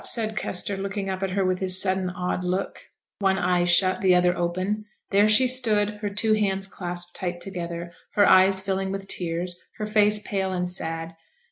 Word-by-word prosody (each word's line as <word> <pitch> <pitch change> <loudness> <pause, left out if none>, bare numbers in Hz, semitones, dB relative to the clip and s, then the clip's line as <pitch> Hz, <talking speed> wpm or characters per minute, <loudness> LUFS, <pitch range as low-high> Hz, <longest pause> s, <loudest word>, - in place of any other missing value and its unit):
said 220 -2 +1
Kester, 200 0 -2
looking 195 0 -4
up 190 0 -5
at 195 - -1
her 195 +1 0
with 185 0 0
his 185 -1 +5
sudden 190 -1 +1
odd 180 0 -3
look, 180 +2 -3 0.4
one 190 -1 +2
eye 180 -1 +1
shut, 185 +1 +3
the 185 -2 +4
other 180 0 +3
open: 185 +5 -2 0.3
there 205 +2 +4
she 215 +5 +4
stood, 220 -5 +1
her 205 - -2
two 215 +2 0
hands 195 -2 0
clasped 175 -2 -5
tight 175 -1 -4
together, 170 -2 -6 0.2
her 205 - +4
eyes 190 +1 +5
filling 190 0 -2
with 195 0 -5
tears, 175 0 -3 0.2
her 215 - -3
face 210 0 +4
pale 195 -2 -3
and 180 -1 -2
sad. 165 -2 -3
190 Hz, 190 wpm, -24 LUFS, 180-205 Hz, 0.4 s, his